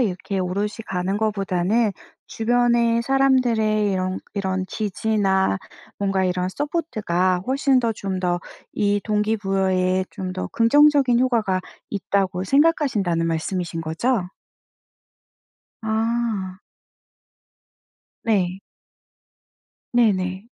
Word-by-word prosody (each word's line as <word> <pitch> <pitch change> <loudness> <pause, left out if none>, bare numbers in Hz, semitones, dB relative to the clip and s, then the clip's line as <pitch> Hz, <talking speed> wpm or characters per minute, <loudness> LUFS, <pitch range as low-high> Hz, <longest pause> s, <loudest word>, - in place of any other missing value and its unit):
이렇게 195 -2 -1
오롯이 190 +3 -1 0.2
가는 185 +2 -1
거보다는 205 0 +1 0.3
주변에 235 0 +2
사람들의 235 -6 +2
이런 185 0 -1 0.2
이런 190 -2 -1
지지나 195 - 0 0.4
뭔가 195 -1 0
이런 180 0 0
서포트가 195 - -1
훨씬 270 0 +2
더 230 -2 0
좀 195 -3 -4
더 175 -1 0 0.3
이 205 -1 +1
동기부여에 195 -3 +1
좀 185 -1 -5
더 185 - -4
긍정적인 270 0 +4
효과가 220 -7 +1 0.3
있다고 195 -2 -1
생각하신다는 250 - +2
말씀이신 165 +1 -2
거죠? 180 +5 -1 1.5
아. 220 -4 -1 1.6
네. 190 -4 0 1.3
네네. 195 -4 +1
200 Hz, 215 characters per minute, -22 LUFS, 185-230 Hz, 1.6 s, 긍정적인